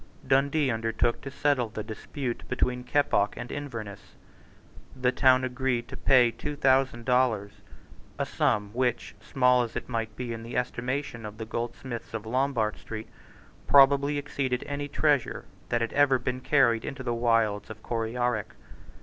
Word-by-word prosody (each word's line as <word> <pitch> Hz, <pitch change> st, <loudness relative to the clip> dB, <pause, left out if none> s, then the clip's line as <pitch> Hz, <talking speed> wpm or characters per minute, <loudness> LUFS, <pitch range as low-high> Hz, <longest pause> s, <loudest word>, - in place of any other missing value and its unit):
Dundee 140 Hz, +1 st, +2 dB
undertook 115 Hz, +1 st, 0 dB
to 140 Hz, -, -6 dB
settle 140 Hz, -3 st, +1 dB
the 110 Hz, 0 st, -5 dB
dispute 120 Hz, +3 st, -5 dB
between 125 Hz, 0 st, -1 dB
Keppoch 125 Hz, -6 st, +1 dB
and 120 Hz, -, -6 dB
Inverness. 115 Hz, -9 st, -7 dB, 0.8 s
The 125 Hz, 0 st, +3 dB
town 130 Hz, -1 st, +4 dB
agreed 125 Hz, -1 st, -1 dB
to -, -, -7 dB
pay 125 Hz, -3 st, +4 dB
two 150 Hz, +5 st, -5 dB
thousand 130 Hz, -4 st, +2 dB
dollars, 125 Hz, -6 st, +2 dB, 0.7 s
a -, -, -1 dB
sum 105 Hz, -1 st, 0 dB
which, 125 Hz, -1 st, -1 dB
small 125 Hz, -1 st, +3 dB
as 120 Hz, -2 st, -4 dB
it -, -, -4 dB
might 115 Hz, -3 st, -3 dB
be 120 Hz, -1 st, -4 dB
in 115 Hz, -, -6 dB
the 115 Hz, +2 st, -5 dB
estimation 125 Hz, 0 st, -3 dB
of 105 Hz, 0 st, -8 dB
the 110 Hz, -, -5 dB
goldsmiths 115 Hz, +1 st, -5 dB
of 110 Hz, -1 st, -5 dB
Lombard 120 Hz, -2 st, 0 dB
Street, 110 Hz, 0 st, -7 dB, 0.6 s
probably 140 Hz, +1 st, +5 dB
exceeded 135 Hz, -3 st, -2 dB
any 145 Hz, 0 st, -4 dB
treasure 145 Hz, -4 st, +1 dB, 0.2 s
that 120 Hz, -1 st, +1 dB
had 115 Hz, -, -2 dB
ever 145 Hz, -2 st, +4 dB
been 125 Hz, +1 st, -3 dB
carried 120 Hz, -5 st, +3 dB
into 135 Hz, -1 st, -6 dB
the 120 Hz, -, -1 dB
wilds 115 Hz, -3 st, +1 dB
of 110 Hz, 0 st, -10 dB
Coryarrick. 115 Hz, -1 st, -2 dB
125 Hz, 155 wpm, -27 LUFS, 115-135 Hz, 0.8 s, probably